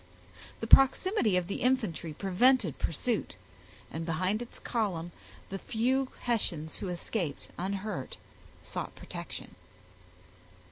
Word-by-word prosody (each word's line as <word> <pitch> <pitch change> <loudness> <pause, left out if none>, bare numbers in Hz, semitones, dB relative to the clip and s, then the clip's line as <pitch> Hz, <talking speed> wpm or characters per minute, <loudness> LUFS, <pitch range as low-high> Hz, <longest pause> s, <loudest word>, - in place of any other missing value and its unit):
The - - -1
proximity 270 - +6
of 180 - +1
the 195 - -4
infantry 220 -11 +1
prevented 195 - +3
pursuit, 185 - -1 0.6
and 160 - -3
behind 185 +6 0
its 240 - -8
column 185 -8 -1 0.4
the 195 - -3
few 255 +6 +1
Hessians 170 -10 -1
who 200 - -4
escaped 175 -3 -3
unhurt 190 -5 -3 0.5
sought - - -5
protection. - - -7
195 Hz, 105 wpm, -31 LUFS, 170-240 Hz, 0.6 s, proximity